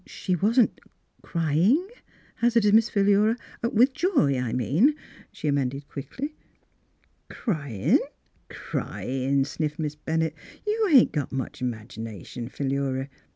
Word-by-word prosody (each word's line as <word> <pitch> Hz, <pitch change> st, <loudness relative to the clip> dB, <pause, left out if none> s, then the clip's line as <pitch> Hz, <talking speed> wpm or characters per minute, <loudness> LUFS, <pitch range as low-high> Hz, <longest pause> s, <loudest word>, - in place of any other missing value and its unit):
She 185 Hz, -, -2 dB
wasn't 220 Hz, +6 st, +2 dB, 0.2 s
— -, -, -37 dB
crying? 170 Hz, -, +2 dB, 0.3 s
" -, -, -30 dB
hazarded 230 Hz, -3 st, +4 dB
Miss 225 Hz, +1 st, +5 dB
Philura, 205 Hz, +2 st, +3 dB, 0.2 s
— -, -, -37 dB
"with 250 Hz, +5 st, +4 dB
joy, 290 Hz, -, +2 dB
I 125 Hz, -2 st, -2 dB
mean," 150 Hz, -, +3 dB, 0.4 s
she -, -, -5 dB
amended 140 Hz, 0 st, -1 dB
quickly. 270 Hz, -, -6 dB, 0.5 s
" -, -, -41 dB
Cryin'? 140 Hz, -, 0 dB, 0.3 s
— -, -, -40 dB
cryin'," 135 Hz, +1 st, -2 dB
sniffed 150 Hz, +1 st, -3 dB
Miss 150 Hz, -2 st, -2 dB
Ben 160 Hz, +2 st, -2 dB
nett. 160 Hz, -2 st, -1 dB, 0.2 s
" -, -, -25 dB
You 425 Hz, 0 st, +1 dB
ain't 265 Hz, -5 st, +7 dB
got 145 Hz, -4 st, -2 dB
much 135 Hz, -1 st, -4 dB
'magination, 115 Hz, -1 st, -6 dB
Philura. 135 Hz, -1 st, -2 dB
155 Hz, 140 wpm, -26 LUFS, 135-225 Hz, 0.5 s, ain't